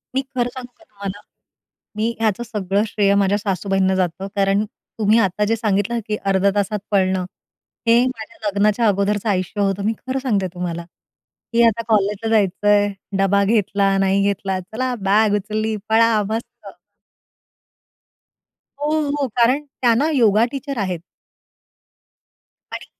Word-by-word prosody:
मी 265 - +2
खरं 245 -1 0
सांगू 250 -1 -9
का - - -21
तुम्हाला. 200 -1 -8 0.8
मी 220 +2 0
ह्याचं 220 0 0
सगळं 205 -3 -1
श्रेय 200 -1 +2
माझ्या 195 +1 +1
सासूबाईंना 195 -1 0
जातं, 185 0 -1
कारण 195 +1 +2 0.3
तुम्ही 215 +1 +4
आता 210 -1 +1
जे 225 +2 +1
सांगितलं, 215 +1 0
की 210 - 0
अर्ध्या 195 0 +3
तासात 205 +1 0
पळणं. 190 -2 +1 0.6
हे 235 +2 +5
माझ्या 220 -3 -5
लग्नाच्या 210 +3 +2
अगोदरचं 205 +1 0
आयुष्य 190 +1 -1
होतं. 195 0 0
मी 220 - +2
खरं 260 +1 -1
सांगते 205 -8 0
तुम्हाला, 170 -1 -4 0.7
की 235 0 +4
आता 230 0 +1
कॉलेजला 210 0 +1
जायचंय 205 0 +3 0.3
डबा 195 +1 +3
घेतला, 200 -2 +2
नाही 195 +1 +2
घेतला, 195 -1 -1
चला 240 +7 -3 0.2
बाग 210 0 +4
उचलली, 215 +2 -2
पळा, 225 -1 +4
मस्त. 225 -2 -6 2.1
हो, 295 - 0 0.2
हो. 285 -1 -1
कारण 255 +5 +3
त्या 250 -4 +1
ना, 290 +7 +2
योगा 225 -4 +4
टीचर 275 -1 -5
आहेत. 185 -5 -2 1.7
आणि - - -6
205 Hz, 140 wpm, -20 LUFS, 195-230 Hz, 2.1 s, हे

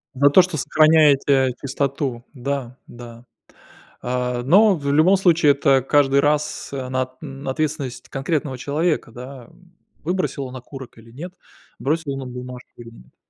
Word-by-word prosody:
За 140 +2 +4
то, 185 - +7
что 180 -3 -3
сохраняете 140 -4 +4
чистоту, 135 -3 -3
да, 130 -2 -4
да. 120 0 -12 0.8
А, 125 0 -2
но 200 - +5
в 140 -3 -3
любом 180 +6 +5
случае 170 -6 +4
это 135 -1 +2
каждый 140 0 +3
раз, 150 0 -1
она 130 -1 -3 0.3
ответственность 135 -3 -3
конкретного 135 -1 -2
человека, 150 -1 -1
да, 125 +1 -10
м. 175 +6 -23 0.3
Выбросил 175 -4 -2
он 130 - -9
окурок 130 -1 -11
или 115 +1 -17
нет, 175 +9 -9 0.5
бросил 150 0 -1
он 135 - -5
нам 130 -2 -7
бумажку 125 0 -9
или 115 -1 -11
нет. 60 - -18
140 Hz, 145 wpm, -21 LUFS, 125-155 Hz, 0.8 s, то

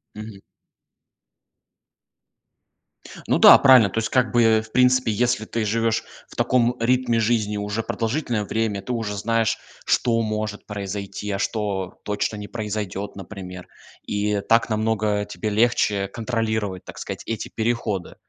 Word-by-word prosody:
Мгм. 105 -1 -9 2.9
Ну - - +3
да - - +10
правильно, 125 -7 +6
то 115 - -1
есть, 110 - -2
как 125 -4 +2
бы, 115 -2 +4
в 110 - -19
принципе, 125 -2 +3
если 120 +1 0
ты 115 +1 -2
живешь 115 +1 0 0.2
в - - -16
таком 120 0 +2
ритме 120 0 +2
жизни 110 -2 0
уже 105 +2 -3
продолжительное 115 0 -2
время 105 -1 -2
ты 110 - -6
уже 115 -4 -2
знаешь, 115 +2 0 0.3
что 115 -1 +2
может 110 -1 -3
произойти, 100 0 -5
а 100 - -1
что 100 -3 -3
точно 105 +1 -2
не 105 0 -7
произойдет, 105 -3 -4
например, 95 -2 -9 0.4
и 105 0 0
так 115 +3 +2
намного 110 -1 0
тебе 110 - -4
легче 105 -3 +2
контролировать 110 -3 -3
так - - -10
сказать - - -6
эти 115 -2 -4
переходы, 110 -5 -2
110 Hz, 140 wpm, -23 LUFS, 105-115 Hz, 2.9 s, да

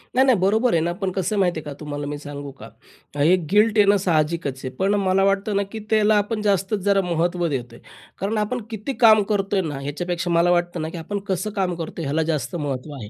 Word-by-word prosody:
नाही-नाही 260 -2 +5
बरोबर 220 +6 +2
आहे 165 - +3
ना 170 +2 0
पण 190 -1 0
कसं 190 +2 -2
आहे - - 0
माहिती 180 -4 +1
आहे - - -10
का 145 - -5
तुम्हाला 145 -1 -5
मी 145 0 -4
सांगू 145 -1 -8
का. 135 - -12 0.5
हे 155 +6 +5 0.2
गिल्ट 215 +1 +4
येणं 205 -1 +5
साहजिकच 155 -4 0
आहे. - - -2
पण 195 +7 +1
मला 190 +1 +3
वाटतं 195 +1 +1
ना 200 - +2
की 225 - -5
त्याला 215 -1 +4
आपण 210 +1 -1
जास्तच 200 0 +1
जरा 200 -1 +4
महत्त्व 175 0 0
देतोय. 120 -5 -5 0.4
कारण 205 +3 -1
आपण 215 +4 -1
किती 225 +4 -4
काम 215 -2 +7
करतोय 195 -1 +1
ना, 150 -6 -4
ह्याच्यापेक्षा 175 +5 -3
मला 170 +1 +3
वाटतं 175 -1 0
ना 160 - -3
की 170 - -8
आपण 200 +5 -4
कसं 190 +1 -1
काम 185 -3 0
करतोय? 165 0 -6
याला 145 +4 0
जास्त 155 +3 -3
महत्त्व 145 -2 -4
आहे. 110 -6 -8
180 Hz, 225 wpm, -22 LUFS, 155-205 Hz, 0.5 s, काम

